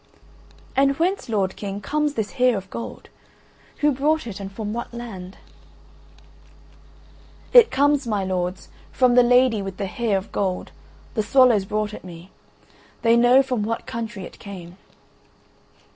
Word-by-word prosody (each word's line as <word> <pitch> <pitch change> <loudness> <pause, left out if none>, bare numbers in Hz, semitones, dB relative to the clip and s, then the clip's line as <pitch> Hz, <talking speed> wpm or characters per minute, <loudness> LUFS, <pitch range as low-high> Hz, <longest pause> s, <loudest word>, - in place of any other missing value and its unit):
"And 275 0 +3
whence, 365 -2 -1
lord 195 -4 0
King, 200 -1 -5
comes 295 +7 -1
this 215 -2 -2
Hair 250 -4 +2
of 195 0 -8
Gold; 230 - -7 0.7
who 295 0 +4
brought 295 +3 0
it 205 -4 -7
and 195 -1 -7
from 210 +1 -5
what 235 - -5
land?" 195 -6 -8 2.2
"It 485 -2 +9
comes, 285 -1 +2
my 210 -3 0
lords, 185 0 -3 0.2
from 255 -2 +3
the 250 - +7
Lady 245 -2 +4
with 195 -1 -6
the 200 - -2
Hair 210 +1 -1
of 195 +2 -7
Gold, 185 -2 -2 0.4
the 220 - 0
swallows 230 -2 +4
brought 210 +1 -2
it - - -9
me. 175 0 -11 0.7
They 230 0 +5
know 245 +3 +6
from 255 -4 -2
what 225 +2 -3
country 230 -5 -5
it - - -11
came." 180 -3 -10
225 Hz, 150 wpm, -23 LUFS, 195-255 Hz, 2.2 s, It